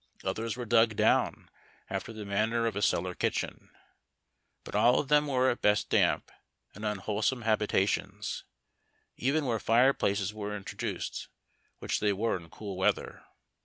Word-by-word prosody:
others 115 0 -2
were 125 - -4
dug 115 -1 +4
down - - +2 0.4
after - - -4
the 110 -2 -7
manner 110 +4 +1
of 115 - -1
a - - -1
celhir 90 -2 +1
kitchen; - - -2 0.9
but - - -10
all 115 +4 +5
of 140 - -3
them 150 0 +4
were 130 -2 +3
at 120 - -5
best 105 0 +2
damp - - +2 0.4
and 105 - -10
unwholesome 105 +4 -1
habi 110 -1 +2
tations 95 0 -1 0.4
— - - -44 0.3
even 140 +4 0
where 115 -3 0
fireplaces 110 -5 +2
were 105 -1 -4
introduced, 100 - -5 0.5
which - - -2
they 105 - +2
were 110 +4 0
in 85 -3 -8
cool 100 +1 -7
weather. 95 - 0
110 Hz, 155 wpm, -30 LUFS, 100-120 Hz, 0.9 s, all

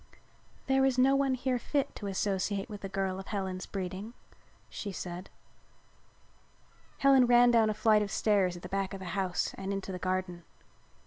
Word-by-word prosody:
"There 265 0 +3
is 265 -1 +2
no 265 +2 +5
one 275 -1 +2
here 255 0 -1
fit 280 +2 -1
to 205 - -5
associate 195 0 -1
with 205 -1 -8
a 195 - -4
girl 190 -1 -2
of 195 - -9
Helen's 190 -3 -4
breeding," 195 +4 -5 0.5
she 205 - -6
said. 180 0 -6 1.7
Helen 270 -2 +5
ran 240 0 +6
down 225 -2 +4
a 215 - -1
flight 215 0 +4
of 205 - -2
stairs 195 -4 +2
at 175 - -13
the - - -5
back 195 +1 -2
of - - -7
the 190 - -8
house 190 -2 -1
and 195 0 -3
into 195 -1 -4
the 180 - -5
garden. 185 -1 -2
200 Hz, 180 wpm, -30 LUFS, 190-240 Hz, 1.7 s, ran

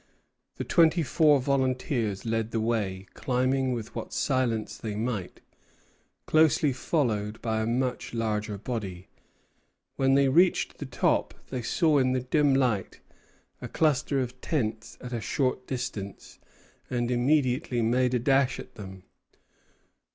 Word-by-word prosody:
The - - -4
twenty 165 0 +3
four 150 +1 +4
volunteers 130 -5 -1
led 115 -1 -1
the 115 - -2
way, 105 -4 -1
climbing 130 +1 0
with 115 -3 -4
what - - -6
silence 125 -5 0
they 110 -2 -5
might, 110 -4 -4 0.8
closely 155 -2 +3
followed 110 -7 -1
by 110 -1 -1
a 110 - -1
much 125 +1 -1
larger 110 -2 -2
body. 100 -5 -5 0.9
When 135 0 +3
they 140 0 +4
reached 175 +7 +3
the 145 - -5
top 125 - 0 0.2
they 130 -2 -2
saw 155 +4 +2
in 130 -1 +2
the 130 - 0
dim 140 +2 +2
light 120 -8 0 0.6
a - - -5
cluster 145 -2 +1
of 125 0 -6
tents 110 -7 -2
at 125 -1 -7
a 115 - -2
short 130 +1 -1
distance, 110 -7 -6 0.5
and 120 -1 -1
immediately 125 -1 +1
made 125 +2 +2
a - - +2
dash 135 +1 +2
at - - -10
them. 95 -2 -10
125 Hz, 135 wpm, -27 LUFS, 110-135 Hz, 0.9 s, four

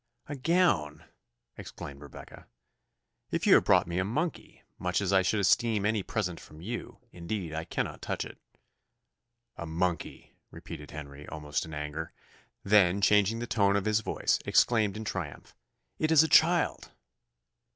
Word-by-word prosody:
"A 145 - -6
gown!" 130 - +1 0.5
exclaimed 70 0 -9
Rebecca. 70 -2 -12 0.8
"If - - -2
you - - +6
have - - +5
brought - - +4
me 85 +1 -3
a - - +2
monkey, 150 - -4 0.2
much 90 0 0
as 100 -1 -1
I 95 - +5
should 105 +3 0
esteem 105 +1 +2
any 105 -1 +1
present 90 -4 -3
from 75 - -14
you, 115 +8 -6
indeed 85 -1 -5
I 80 +1 -4
cannot - - -4
touch - - -3
it." - - -12 1.2
"A 85 - -6
monkey!" 85 0 -3 0.2
repeated 75 - -10
Henry, 75 -1 -9
almost 75 -1 -3
in 80 - -10
anger: 75 +2 -5 0.5
then 100 -2 +4
changing 105 +2 +3
the 120 - -4
tone 100 -4 +2
of 100 0 0
his 110 0 +2
voice, 110 - 0
exclaimed 110 -4 +2
in 110 - -6
triumph, 90 -8 -6 0.5
"It 155 0 +1
is 160 -1 +7
a - - +1
child!" 170 +1 +3
100 Hz, 155 wpm, -29 LUFS, 80-110 Hz, 1.2 s, is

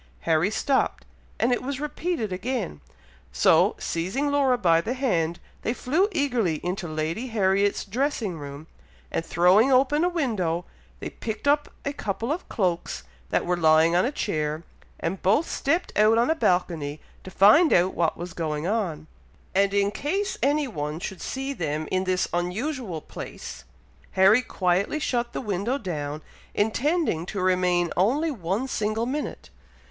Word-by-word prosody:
Harry 165 +3 +2
stopped, 265 +5 0 0.3
and 245 - +2
it - - -1
was 270 +1 -4
repeated 300 - -2
again, 200 - -3 0.5
so - - +4
seizing 215 +13 -2
Laura 275 -3 +3
by 165 -6 +3
the 240 +9 -3
hand, 170 -11 0 0.2
they 230 - -1
flew 320 +13 +1
eagerly 250 - +1
into 180 +1 -2
Lady 160 +9 -3
Harriet's 200 -3 +1
dressing 220 - -2
room, 140 +1 -8 0.5
and - - -1
throwing 185 +10 +4
open 275 +4 +4
a 355 - +3
window, 200 - -1 0.3
they - - -6
picked 220 +4 -5
up 290 +1 +3 0.2
a 280 - -1
couple 230 0 -3
of 340 +4 -4
cloaks 180 -5 -1 0.3
that - - +1
were 180 - +1
lying 160 0 +4
on 180 - +4
a 255 - 0
chair, 155 - -2 0.4
and 180 +3 -3
both 220 - +3
stepped 320 +6 -1
out 215 +2 +5
on 240 +6 +3
a - - +5
balcony 165 - 0 0.2
to - - -8
find 220 - +6
out 180 +2 +4
what 165 -2 0
was 175 0 -6
going 155 -2 -3
on; 180 -7 -1 0.5
and 195 +1 +3
in 200 0 +2
case 390 - -2
any 290 +1 +2
one 150 - -4
should 185 0 -6
see 270 +1 -3
them 155 - -3
in 185 0 +1
this 185 0 +1
unusual 185 - -2
place, - - -9 0.5
Harry 195 +6 +6
quietly 190 +2 0
shut 240 -5 -1
the - - -4
window 210 +3 -1
down, 155 - -4 0.3
intending 235 - +1
to 195 +3 -5
remain 180 -2 +2
only 275 - +2
one 205 - -2
single 220 -2 -1
minute. 285 +4 -4
200 Hz, 155 wpm, -25 LUFS, 175-265 Hz, 0.5 s, find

